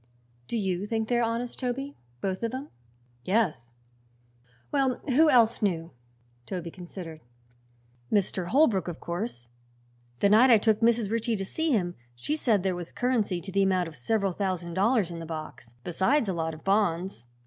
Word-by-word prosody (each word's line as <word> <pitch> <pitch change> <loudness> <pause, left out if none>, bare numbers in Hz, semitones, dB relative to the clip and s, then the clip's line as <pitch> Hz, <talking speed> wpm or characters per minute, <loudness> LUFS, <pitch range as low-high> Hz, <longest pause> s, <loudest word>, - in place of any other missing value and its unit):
"Do 235 - -2
you 190 -1 -1
think 220 0 -1
they 240 -1 +3
are - - +2
honest, 235 +1 -2
Toby 270 +3 -3 0.3
both 190 -1 -2
of 230 +2 -2
'em?" 275 +3 -6 0.5
"Yes." 175 - 0 1.0
"Well, 270 -3 +2
who 305 +4 +4
else 235 -4 +4
knew?" 170 -5 0 0.6
Toby 175 -3 -4
considered. 175 -3 -9 0.9
"Mr. 190 -3 +1
Holbrook, 230 - +3
of 175 -2 -5
course. 170 - -5 0.7
The 200 - +4
night 225 +5 +7
I 235 - +8
took 215 0 +2
Mrs. 230 -2 +2
Ritchie 230 0 0
to 195 -2 -3
see 320 +11 -2
him 185 -10 +1 0.2
she 290 - -2
said 225 -11 +2
there 190 -1 +1
was 175 -1 -6
currency 230 -8 0
to 190 - -7
the 195 +1 +2
amount 185 -2 +2
of 160 - -10
several 195 - 0
thousand 180 -3 -2
dollars 200 0 +2
in 170 - -6
the 165 - -6
box, 155 -7 -8
besides 210 - +1
a 190 - 0
lot 160 -1 -2
of 155 - -14
bonds." 190 - 0
195 Hz, 170 wpm, -28 LUFS, 175-235 Hz, 1.0 s, I